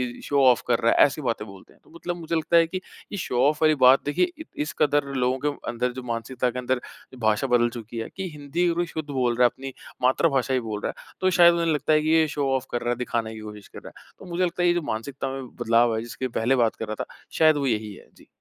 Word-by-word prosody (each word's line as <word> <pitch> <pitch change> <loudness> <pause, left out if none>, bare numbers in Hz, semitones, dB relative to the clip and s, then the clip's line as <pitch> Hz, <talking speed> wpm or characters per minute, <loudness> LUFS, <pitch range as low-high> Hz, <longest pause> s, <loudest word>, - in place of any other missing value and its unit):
इ - - -13
इ - - -13
show - - -10 0.2
off 125 -3 +5
कर 120 - +3
रहा 115 - +4
है, - - +6
ऐसी 145 +2 -3
बातें 115 -5 -2
बोलते 95 -1 -14
हैं। - - -27
तो - - -23
मतलब 175 +1 -4
मुझे 165 -1 -4
लगता 165 +1 +2
है 165 -1 +5
कि 185 - -4 0.3
ये 205 - -4
शो 125 -9 -2
ऑफ 150 +1 0
वाली 155 -1 +5
बात 130 +2 +6
देखिए 145 - +1
इ - - -6 0.2
इस 150 - -3
कदर 145 -1 +3
लोगों 125 0 +1
के 145 -1 -3
अंदर 120 +1 -1
जो 130 0 -7
मानसिकता 125 +2 -2
के 125 - -5
अंदर 125 0 -1 0.3
जो - - -11
भाषा 110 +3 +1
बदल 120 -1 +3
चुकी 115 0 -9
है, 115 - -4
कि 190 -1 -4
हिंदी 150 +3 -2
अगर 170 0 -1
वो 175 - +1
शुद्ध 160 -3 -6
बोल 125 -4 0
रहा 125 - +4
है 120 - +6
अपनी, 135 +1 -9 0.3
मातृभाषा 135 0 +2
ही 130 - +2
बोल 110 -3 -5
रहा - - -3
है - - -16
तो 185 - +3
शायद 175 -1 +6
उन्हें 170 -1 +1
लगता 150 +1 +1
है 155 - +4
कि 155 - -1
ये 160 0 +4
शो 145 -2 -2
ऑफ 130 0 -2
कर 120 - -2
रहा 120 - -2
है 120 - +1
दिखाने 115 -2 -2
की 110 - -9
कोशिश 105 -2 -10
कर - - -11
रहा - - -12
है। - - -21
तो - - -12
मुझे 175 +2 -1
लगता 180 0 -1
है - - +4
ये 175 - +4
जो 175 - -1
मानसिकता 130 +5 -4
में 135 -1 -6
बदलाव 115 0 +3
है 110 - -2
जिसके 120 +3 -5
पहले 120 +2 +1
बात 115 -3 +2
कर 115 - -6
रहा 110 0 -4
था - - -10 0.3
शायद 155 -2 +5
वो 140 -1 0
यही 110 -3 -1
है। - - -15
जी। - - -20
130 Hz, 295 wpm, -25 LUFS, 120-155 Hz, 0.3 s, है